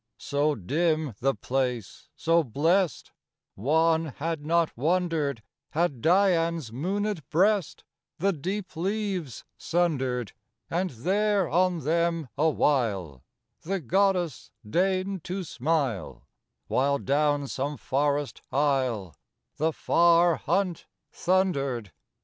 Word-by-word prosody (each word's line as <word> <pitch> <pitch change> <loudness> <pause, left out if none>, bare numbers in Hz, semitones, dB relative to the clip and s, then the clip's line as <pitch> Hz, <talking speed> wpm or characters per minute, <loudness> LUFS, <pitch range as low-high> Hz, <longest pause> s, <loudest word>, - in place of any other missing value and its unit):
IV - - -16
So 145 +1 +1
dim 155 - 0
the 135 +2 +1
place, 125 -5 -3
so 165 +1 +2
blest, 160 - +1 0.4
One 160 +8 +2
had 155 +1 -4
not 165 +1 +1
wondered 155 -4 0 0.3
Had 155 -6 0
Dian's 170 - +2
moonéd 195 - -2
breast 190 +2 +1 0.3
The 195 +3 +1
deep 185 +6 -4
leaves 190 - -3
sundered, 130 - 0 0.4
And 180 +3 0
there 195 - +1
on 180 +1 +1
them 165 -1 0
a 155 +4 +3
while 100 - 0 0.4
The 195 +4 -2
goddess 180 - 0 0.2
deigned 185 - 0
to 185 +1 -3
smile, 135 - -2 0.4
While 140 +2 +1
down 145 0 +1
some 140 +2 -3
forest 145 +1 -1
aisle 130 - 0 0.4
The 160 +2 +1
far 170 +1 +4
hunt 185 -4 -1 0.2
thundered. 140 - 0
160 Hz, 105 wpm, -27 LUFS, 135-180 Hz, 0.4 s, far